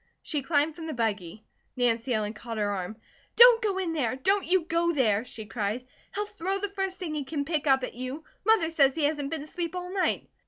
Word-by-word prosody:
She 295 -3 -1
climbed 295 +2 +1
from 325 -2 -7
the 315 - -4
buggy. 215 -3 -2 0.3
Nancy 240 0 +1
Ellen 215 -2 0
caught 230 +1 -7
her 205 -1 0
arm. 195 +2 -4 0.4
"Don't 480 -1 +9
go 410 -4 0
in 360 -4 -1
there! 255 -6 0
Don't 385 +9 +1
you 370 +1 +3
go 335 +1 +1
there," 225 -7 +2
she 225 -3 -9
cried. 220 +2 -3 0.3
"He'll 415 +1 0
throw 390 -2 -3
the 410 +1 -3
first 385 -1 -3
thing 340 -5 -4
he 300 -2 -2
can 285 +1 -3
pick 305 -1 -1
up 265 -1 +4
at - - -4
you. 255 +6 -6 0.2
Mother 390 -6 +3
says 275 -4 +4
he 320 - -1
hasn't 290 -1 0
been 315 -2 -4
asleep 335 +3 -4
all 360 0 -5
night." 380 -2 0
295 Hz, 225 wpm, -28 LUFS, 240-360 Hz, 0.4 s, Don't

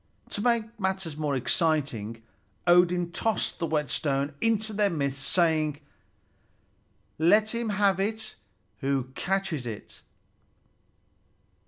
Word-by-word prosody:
To 205 - -3
make 230 -1 0
matters 190 -5 -2
more 150 -2 -1
exciting, 130 -6 0 0.4
Odin 175 0 +4
tossed 220 +3 -1
the 165 - 0
whetstone 145 -1 0
into 220 -1 +1
their 205 -1 +2
midst, 140 -5 -2
saying: 155 -3 +2 1.4
"Let 210 +7 +4
him 235 -1 -2
have 200 -2 +2
it 220 +2 -2 0.5
who 135 -1 -1
catches 180 -7 -1
it!" 110 -3 -8
170 Hz, 105 wpm, -27 LUFS, 145-205 Hz, 1.4 s, Odin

